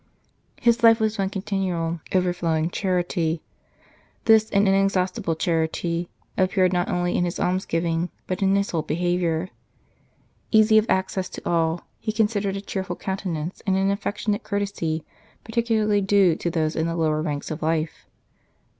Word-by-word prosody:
His 235 -1 +3
life 230 0 +7
was 220 -1 0
one 195 -1 +1
continual 185 -5 -2
overflowing 175 -3 +1
charity. 175 -4 -1 0.8
This 220 -1 +5
in 200 0 +3
exhaustible 190 -3 +1
charity 170 +1 -1 0.3
appeared 185 -1 +3
not 175 0 0
only 175 0 0
in - - +2
his 175 -1 -2
almsgiving, 170 -2 0 0.2
but 185 +2 -3
in 195 0 +3
his 200 0 0
whole 165 - 0
behaviour. 175 +2 -1 1.0
Easy 220 0 +6
of 215 - -3
access 190 0 0
to - - -8
all, 165 0 +1 0.2
he 220 - -2
considered 210 -3 0
a - - -5
cheerful 190 -3 -4
countenance 180 -4 -4
and 190 0 +3
an 195 +1 +2
affectionate 205 +1 -2
courtesy 200 -7 -2 0.4
particularly 225 -3 +1
due 195 -3 +4
to 170 - -2
those 160 -2 -1
in 160 +1 0
the 165 - -2
lower 155 -2 +1
ranks 150 -2 -3
of 155 - -5
life. 160 0 -2
185 Hz, 145 wpm, -24 LUFS, 165-200 Hz, 1.0 s, life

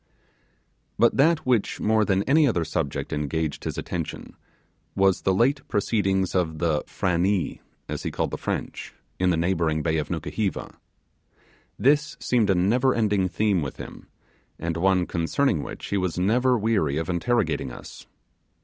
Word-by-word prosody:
But 120 - +4
that 160 +3 +3
which 125 -5 +1
more 110 0 +2
than 100 -1 +1
any 150 +4 +4
other 85 -9 0
subject 80 -5 -3
engaged 75 +1 -2
his - - -3
attention 85 -3 -5 0.6
was 95 -1 +3
the 95 - +1
late 125 +9 +2
proceedings 95 -3 0
of 85 -4 0
the 80 -2 +1
'Frannee' 90 +1 0 0.3
as - - -4
he - - -3
called - - -2
the - - -3
French, - - -4 0.2
in 90 0 +2
the 85 - +2
neighbouring 80 -3 0
bay 80 -1 +1
of 75 - -3
Nukuheva. 90 +5 -3 1.0
This 145 +2 +2
seemed 115 -5 +1
a 95 - +4
never 120 +9 +2
ending 105 -4 +1
theme 100 -1 +1
with 70 -2 -5
him, - - -10 0.5
and 85 -1 -3
one 90 +1 +2
concerning 85 - 0
which - - -7
he 100 - 0
was 90 -3 -2
never 125 +7 +2
weary 100 -10 +1
of 80 0 -2
interrogating 90 - 0
us. - - -11
95 Hz, 155 wpm, -25 LUFS, 85-115 Hz, 1.0 s, But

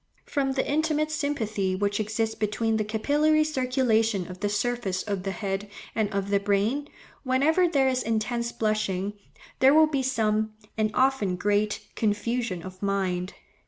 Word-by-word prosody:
From 270 -2 0
the 265 - -1
intimate 305 +1 +1
sympathy 220 -11 -1
which 205 +2 0
exists 220 +1 -1
between 220 +1 0
the 215 - +1
capillary 295 +8 +2
circulation 250 -8 +1
of 180 - -10
the 205 - 0
surface 205 -3 -1
of 200 -3 -2
the 195 - -3
head 195 0 -3 0.2
and 220 -2 0
of 200 0 -2
the 200 - +4
brain, 205 +8 0 0.3
whenever 300 +7 +3
there 275 -5 +2
is 255 -1 +1
intense 235 +1 -1
blushing, 205 -3 -1 0.5
there 270 +2 +6
will 315 0 +7
be 290 -3 -1
some, 220 -4 0 0.2
and 215 -1 +1
often 260 -8 +2
great, 205 +2 0
confusion 215 -3 -1
of 185 0 -10
mind. 190 -2 -1
220 Hz, 155 wpm, -26 LUFS, 200-265 Hz, 0.5 s, will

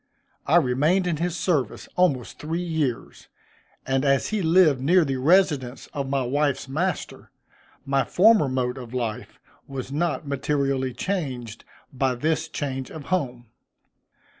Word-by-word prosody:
I 150 - +4
remained 155 +5 +3
in 170 -3 0
his 175 +2 -2
service 145 - -1
almost 145 -10 +1
three 165 +3 -3
years, 155 -8 -3 0.6
and 135 0 0
as 140 -1 +2
he 215 -2 -1
lived 160 -5 +4
near 170 +5 +4
the 135 -2 -2
residence 145 -4 +2
of 140 -2 -3
my 135 -1 0
wife's 140 +2 0
master, 165 +6 -3 0.6
my 135 0 +2
former 205 - +4
mode 130 0 -1
of 125 0 -9
life 115 -4 -4 0.3
was 135 -1 -6
not 155 0 -1
materially 140 -2 -1
changed, 130 - -4 0.3
by 130 -1 0
this 155 +6 -1
change 135 -3 -4
of 155 - -8
home. 125 -9 -2
140 Hz, 140 wpm, -24 LUFS, 130-165 Hz, 0.6 s, I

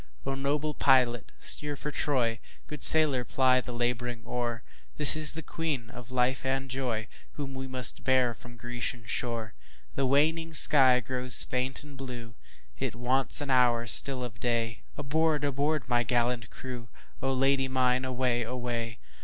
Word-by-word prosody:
O 135 - -3
noble 145 +2 -3
pilot 125 -4 +1
steer 150 -1 +2
for 150 +2 -7
Troy, 120 -7 -2 0.3
Good 150 -2 -10
sailor 150 -6 +9
ply 130 +1 +1
the 125 - -9
labouring 120 0 -4
oar, 120 -1 -5 0.3
This 150 0 +11
is 155 -2 +6
the 160 - -8
Queen 140 -8 -5
of 125 0 -12
life 130 +1 -1
and 135 0 -3
joyWhom 120 -4 -4 0.5
we 130 0 -7
must 130 -2 -2
bear 130 -2 +1
from 120 +2 -15
Grecian 120 0 -6
shore! 115 0 -4 0.4
The 135 -1 -2
waning 160 +4 0
sky 130 -5 +4
grows 125 0 0
faint 130 +3 -3
and 145 -1 -14
blue, 125 -4 -9 0.5
It - - -4
wants 130 +4 +1
an 145 -2 -4
hour 120 -2 +2
still 130 +2 +1
of 115 -2 -9
day, 115 -3 -3 0.2
Aboard! 155 +1 -1
aboard! 145 +1 -2
my 120 -1 +1
gallant 120 -1 -2
crew,O 125 +1 -9
Lady 135 +1 0
mine 130 -1 0
away! 125 -2 -2
away! 120 -1 -5
130 Hz, 155 wpm, -27 LUFS, 120-135 Hz, 0.5 s, This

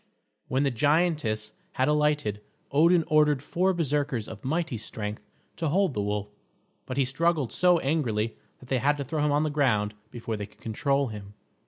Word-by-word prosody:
When 130 +2 +1
the 140 - +2
giantess 145 -5 +1 0.2
had 130 - +1
alighted, 150 -8 +1 0.3
Odin 165 +4 +5
ordered 150 -3 +3
four 185 +5 +1
Berserkers 145 - -1
of 110 -2 -9
mighty 155 -3 -1
strength 105 -1 -5 0.4
to 165 - -1
hold 185 0 +2
the 105 - -1
wolf, 105 0 -2 0.6
but 130 - -4
he 135 - +3
struggled 150 0 0
so 180 -1 +4
angrily 120 -8 0 0.3
that 130 - -14
they 130 - +1
had 145 +4 +2
to 140 - -3
throw 150 +2 -2
him 150 - +2
on 145 +1 +2
the 155 - -1
ground 115 -8 +1 0.2
before 115 -2 -5
they 105 -1 -5
could 105 - -26
control 135 +4 0
him. 105 -1 -9
140 Hz, 180 wpm, -27 LUFS, 110-150 Hz, 0.6 s, Odin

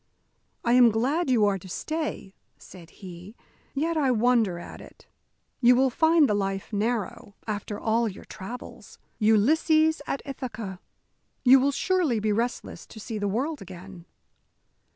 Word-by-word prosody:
"I 235 - +3
am 245 -1 +7
glad 265 +9 0
you 230 -5 +4
are 200 -1 +1
to 185 - -12
stay," 305 - -4 0.2
said 170 -3 -14
he, 185 +3 -11 0.4
"yet 320 +4 0
I 280 -4 +2
wonder 230 -6 +2
at 170 - -10
it. - - -16 0.5
You 245 0 +6
will 260 +1 +3
find 320 +2 +4
the 210 - +1
life 195 +1 -3
narrow, 210 -2 -2
after 205 -1 -4
all 230 +1 +1
your 190 - -11
travels. 235 +7 -10 0.2
Ulysses 310 +9 +3
at 275 - -3
Ithaca 225 -8 -6 0.7
you 260 +2 +8
will 275 +2 +2
surely 330 - 0
be 210 0 0
restless 235 +4 -3
to 220 - -12
see 220 0 -5
the 205 - -1
world 270 +9 -2
again." 185 -1 -11
230 Hz, 150 wpm, -26 LUFS, 200-270 Hz, 0.7 s, you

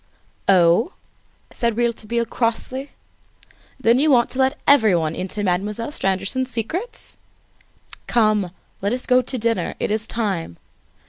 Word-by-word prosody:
"Oh!" 185 - +4 0.6
said 235 -2 -1
Rouletabille 235 -1 0
crossly, 255 +4 -2 0.9
"then 240 0 +4
you 305 +2 +3
want 240 -4 +4
to 260 - -4
let 265 0 +2
everybody 185 - +4
into 190 +3 -3
Mademoiselle 205 +7 -1
Stangerson's 195 +4 0
secrets? 320 - -5 0.9
Come, 215 -5 +2 0.3
let 200 +4 0
us 250 - -2
go 255 0 +4
to 255 +1 -4
dinner; 230 0 -1
it - - -1
is 215 +1 -1
time. 190 - -2
230 Hz, 125 wpm, -21 LUFS, 200-255 Hz, 0.9 s, Oh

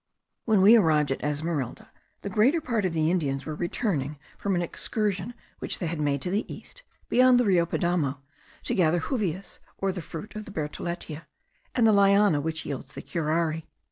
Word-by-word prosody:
When 215 -4 +4
we 215 +4 +9
arrived 155 - +3
at 135 - -3
Esmeralda, 150 -3 -3 0.3
the 200 - -3
greater 250 - +4
part 235 -10 -1
of 180 - 0
the 160 0 +2
Indians 140 -6 -1
were 155 - -4
returning 150 - -2 0.2
from 200 -2 -1
an 175 - +1
excursion 210 +5 -2 0.2
which - - -2
they 180 - -3
had 165 -1 -3
made 140 -2 0
to 180 - -2
the 205 +3 -1
east, - - -10 0.3
beyond 255 0 +5
the 245 - +3
Rio 175 -4 +3
Padamo, 165 -6 0 0.5
to - - -1
gather 175 -2 +3
juvias, 195 - -3 0.2
or 195 0 0
the 185 -1 -5
fruit 165 +7 -8
of 215 0 -6
the - - -10
bertholletia, 160 0 -5 0.5
and 240 - +4
the 220 - +6
liana 200 -5 +5
which 160 +1 -3
yields 140 - -6
the - - -7
curare. 160 -1 -1
175 Hz, 185 wpm, -27 LUFS, 155-205 Hz, 0.5 s, we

